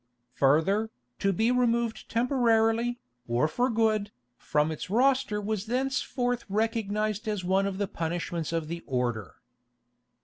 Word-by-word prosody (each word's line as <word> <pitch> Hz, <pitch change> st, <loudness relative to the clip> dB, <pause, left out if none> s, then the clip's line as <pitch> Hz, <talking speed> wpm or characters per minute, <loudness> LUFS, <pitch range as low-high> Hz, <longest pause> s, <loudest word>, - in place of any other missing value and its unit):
Further, 160 Hz, -, +2 dB, 0.3 s
to 195 Hz, -, +2 dB
be 220 Hz, +5 st, +2 dB
removed 235 Hz, -2 st, 0 dB
temporarily, 235 Hz, -1 st, +2 dB, 0.3 s
or 120 Hz, +5 st, +2 dB
for 245 Hz, +11 st, 0 dB
good, 220 Hz, -3 st, +1 dB, 0.2 s
from 150 Hz, +4 st, 0 dB
its 160 Hz, +5 st, -6 dB
roster 255 Hz, -1 st, +2 dB
was 210 Hz, 0 st, -3 dB
thenceforth 245 Hz, -1 st, -1 dB
recognised 215 Hz, 0 st, -1 dB
as 210 Hz, -3 st, -2 dB
one 190 Hz, +2 st, +2 dB
of 195 Hz, -1 st, -4 dB
the 200 Hz, 0 st, -1 dB
punishments 170 Hz, -2 st, -3 dB
of 165 Hz, -2 st, -2 dB
the 170 Hz, +1 st, -5 dB
order. 120 Hz, -5 st, -2 dB
215 Hz, 130 wpm, -28 LUFS, 170-235 Hz, 0.3 s, Further